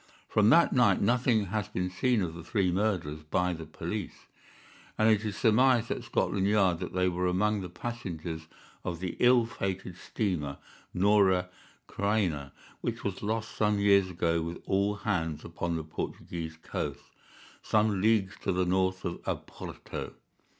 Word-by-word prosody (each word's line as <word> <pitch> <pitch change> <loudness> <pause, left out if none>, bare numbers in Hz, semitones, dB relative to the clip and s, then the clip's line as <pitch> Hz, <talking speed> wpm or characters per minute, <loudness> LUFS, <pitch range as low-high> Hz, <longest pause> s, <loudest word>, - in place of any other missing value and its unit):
From 105 0 +4
that 170 +5 +6
night 120 -7 +4
nothing 115 0 +2
has 100 +1 -2
been 90 0 -2
seen 120 +2 +1
of 85 -2 -3
the 85 0 -9
three 90 +2 +1
murderers 90 -6 -1
by 90 +4 0
the 80 -1 -7
police, 85 +6 -5 0.7
and 110 - +4
it 110 -1 +4
is 105 -3 -3
surmised 120 +1 +4
at - - -2
Scotland 95 -1 0
Yard 95 -5 +3
that 90 - -5
they 90 0 +2
were 90 0 0
among 105 +3 +1
the 90 - -6
passengers 85 -6 -5 0.4
of 85 -2 -4
the 90 -1 -4
ill 125 -1 +5
fated 95 -5 -4
steamer 85 -9 -2 0.3
Norah 95 -2 +3 0.4
Creina, 95 -9 0 0.3
which 115 0 -3
was 100 -2 -3
lost 110 +1 -2
some 105 -1 +2
years 100 -2 +4
ago 85 -1 0
with 85 +1 -4
all 100 +2 +1
hands 85 -7 -2
upon 85 -1 -3
the 80 - -3
Portuguese 80 +1 -5
coast, - - -4 0.6
some 105 -3 +2
leagues 105 -3 +3
to 95 - 0
the 90 0 +1
north 95 +1 +1
of 85 - -3
Oporto. - - -6
95 Hz, 155 wpm, -29 LUFS, 85-105 Hz, 0.7 s, that